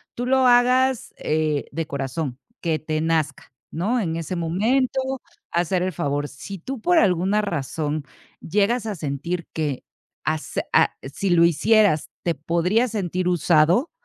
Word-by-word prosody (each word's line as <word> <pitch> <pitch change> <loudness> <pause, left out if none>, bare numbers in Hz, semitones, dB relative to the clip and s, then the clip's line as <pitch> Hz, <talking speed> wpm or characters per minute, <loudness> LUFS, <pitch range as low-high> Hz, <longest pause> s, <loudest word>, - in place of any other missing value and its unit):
tú 245 - -3
lo 260 0 +3
hagas, 250 +1 +3
eh, 155 -2 0
de 165 +2 -3
corazón 135 -1 -4 0.2
que 160 -3 0
te 155 +1 -2
nazca, 160 -3 -1 0.2
¿no?, 210 +10 0
en 165 -7 -1
ese 165 +2 -4
momento 220 +11 +1 0.5
hacer 175 +1 +1
el 185 - -1
favor. 145 0 -1
Si 145 +8 -8
tú 250 +8 -6
por 355 +5 +3
alguna 195 - +3
razón 155 -4 -2 0.4
llegas 210 +6 +1
a 210 - -3
sentir 165 +3 -3
que 150 -5 -2 0.4
hace 155 +1 -2
a - - +4
si 140 +8 -3
lo 170 -1 +5
hicieras, 180 +1 +3
te 170 - +1
podrías 170 - +1
sentir 185 -4 -2
usado, 175 - +3
170 Hz, 145 wpm, -23 LUFS, 155-210 Hz, 0.5 s, lo